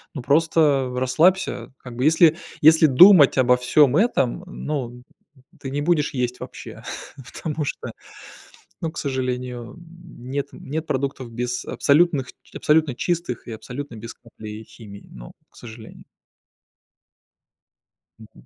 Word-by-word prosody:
ну, 135 - -6
просто 145 -3 +2
расслабься. 155 +10 +1
Как 125 -2 -11
бы 125 +3 -1
если, 160 +1 +5 0.2
если 160 +1 +6
думать 150 +1 +7
обо 125 -1 +4
всём 130 +3 +3
этом, 180 - +1
ну, 125 -8 -5 0.6
ты 135 - -6
не 140 +2 -3
будешь 150 -1 +1
есть 125 -1 -2
вообще, - - -10 0.5
потому 155 -1 -4
что, - - -5 0.9
ну, 165 - -3
к - - -13
сожалению, 125 -3 -4
м, 170 -7 -14
нет 140 +1 -3
нет 155 +3 -6
продуктов 135 -2 -3
без 125 +1 -4
абсолютных 145 -3 +2 0.3
абсолютно 150 -3 +1
чистых 170 -3 -3
и - - -7
абсолютно 125 +4 -8
без 115 +2 -9
капли 110 -2 -11
химии. 105 -3 -14
Ну, - - -11 0.2
к - - -23
сожалению. 110 -2 -12 2.2
Мгм. 110 -1 -17
135 Hz, 125 wpm, -22 LUFS, 125-160 Hz, 2.2 s, думать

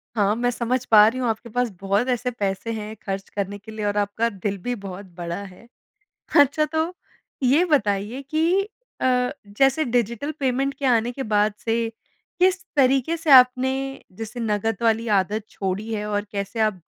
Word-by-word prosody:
हाँ, 205 -1 +2
मैं 245 +1 0
समझ 245 +1 -1
पा 210 -1 +9
रही 245 +4 -1
हूँ 250 - 0
आपके 225 +2 -4
पास 245 +2 0
बहुत 200 +5 +1
ऐसे 250 0 0
पैसे 200 -1 -3
हैं 215 0 -6
ख़र्च 195 0 -4
करने 200 0 -3
के 220 +2 -12
लिए 215 -1 -4
और 205 0 0
आपका 205 +3 0
दिल 200 -1 -4
भी 245 +6 -2
बहुत 195 +1 -7
बड़ा 170 -1 -4
है। 195 +4 -13 0.7
अच्छा 285 +2 +4
तो 320 +3 0 0.5
ये 275 +7 +4
बताइए 220 - 0
कि 330 +5 +2 0.4
अ, 250 -1 +2 0.2
जैसे 270 +9 +2
डिजिटल 240 +2 -1
पेमेंट 270 +1 0
के 280 - -6
आने 240 -1 +2
के 270 - -5
बाद 210 -2 +2
से 225 - -1 0.7
किस 370 +1 +3
तरीक़े 270 +3 +3
से 320 -2 -2
आपने 255 0 +7 0.5
जैसे 225 +3 -6
नगद 220 -1 0
वाली 230 0 +2
आदत 205 +3 -2
छोड़ी 200 +3 -3
है 210 -1 -2
और 205 0 -1
कैसे 200 +2 -3
आप 215 -4 +1
225 Hz, 175 wpm, -23 LUFS, 205-255 Hz, 0.7 s, पा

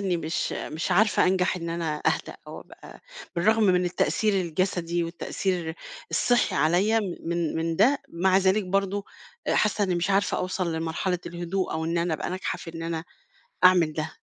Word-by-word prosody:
إني 190 -3 0
مش 165 -1 -2
مش 160 +4 -3
عزارفة 210 +4 +4
أنجح 185 0 +2
إن 170 -1 -4
أنا 165 -2 -2
أهدا، - - 0
أو - - -8
أبقى - - -14 0.4
بالرغم 220 +6 +3
من 180 -2 +3
التأثير 210 +4 +1
الجسدي 175 0 -1
والتأثير 170 0 -3 0.4
الصحي 245 -1 +2
عليّا 190 +8 +3
م 190 -5 -3
من 170 -2 -1
من 165 0 -1
ده 260 - +4
مع 185 +2 +2
ذلك 190 +2 +2
برضه 195 +2 -1 0.4
حاسة 210 0 +2
إني 185 -2 0
مش 175 +3 0
عارفة 195 -1 +2
أوصَل 185 -2 -2
لمرحلة 165 +3 -1
الهدوء، 175 +2 -3
أو 160 0 -2
إن 165 +1 0
أنا 170 -1 0
أبقى 155 - -4
ناجحة 185 +1 -3
في 165 - -10
إن 165 - -6
أنا 165 0 -3 0.6
أعمل 175 -4 +6
ده. 155 +1 -4
180 Hz, 170 wpm, -26 LUFS, 165-195 Hz, 0.6 s, أعمل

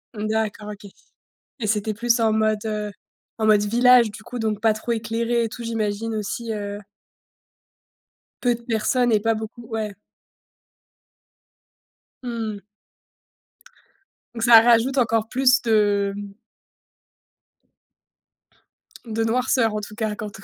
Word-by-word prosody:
D'accord, 215 0 -2
OK. 200 0 -12 0.7
Et 215 - -2
c'était 210 0 0
plus 235 +2 +1
en 220 -1 +3
mode, 215 0 +1
heu, 210 -1 -3 0.5
en 220 - 0
mode 210 -1 +5
village, 240 +1 +5
du 215 - -11
coup, 245 +2 -7
donc 215 -2 -2
pas 220 -1 +3
trop 235 +2 -3
éclairé 230 +1 -1
et - - -2
tout 235 - -9
j'imagine 225 0 -2
aussi 220 +2 -4
heu 205 -1 -5 1.6
peu 245 -1 +2
de 235 - -13
personnes 235 +2 +1
et 215 - +4
pas 225 +2 +1
beaucoup 220 +2 -7
ouais. 215 -3 -4 2.3
Mmh. 225 -4 -4 1.8
Donc, 230 - -4
ça 230 -1 +9
rajoute 240 +3 +3
encore 225 -2 +1
plus 255 0 +3
de 205 -3 +2
hem 205 -1 -8 2.7
de 225 0 -2
noirceur, 230 0 +1
en 215 - -2
tout 210 0 -9
cas, 215 -2 -2
quand 210 0 -6
ton - - -15
220 Hz, 130 wpm, -23 LUFS, 210-235 Hz, 2.7 s, ça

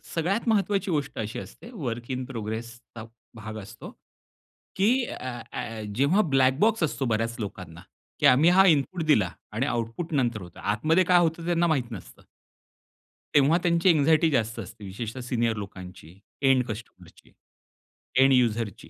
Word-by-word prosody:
सगळ्यात 190 +8 -1
महत्वाची 200 -3 +1
गोष्ट 145 -3 -2
अशी 110 0 -4
असते 235 - -11
वर्क 120 - -5
इन 130 0 -3
प्रोग्रेसचा 115 -1 -7 0.3
भाग 110 -1 -8
असतो 110 +3 -11 0.8
की 195 +3 +3 0.3
ॲ 125 -2 -6
ॲ 115 -1 -5
जेव्हा 140 - +3
ब्लॅक 130 0 +4
बॉक्स 225 -1 +2
असतो 145 -3 -1
बऱ्याच 115 +1 -1
लोकांना 90 -5 -7 0.4
की - - +1
आम्ही 140 +7 +6
हा 190 +2 +6
इनपुट 165 +2 +2
दिला 105 - +3 0.2
आणि 115 +6 -1
आउटपुट 120 +6 -3
नंतर 120 -6 0
होतं. 90 -1 -12
आतमध्ये 155 - +2
काय 180 0 +4
होतं 165 0 0
त्यांना 175 0 +2
माहीत 130 -7 0
नसतं. 100 -6 -10 1.1
तेव्हा 145 +3 +5
त्यांची 170 +1 +3
अँक्झायटी 160 +3 +3
जास्त 115 -3 0
असते. 105 0 -9
विशेषतः 110 +6 -6
सीनियर 120 -2 -1
लोकांची, 95 -3 -10 0.2
एंड 135 -2 +4
कस्टमरची, 105 -6 -10 0.9
एंड 135 0 +6
युझरची. 115 -4 0
125 Hz, 145 wpm, -26 LUFS, 110-160 Hz, 1.1 s, आम्ही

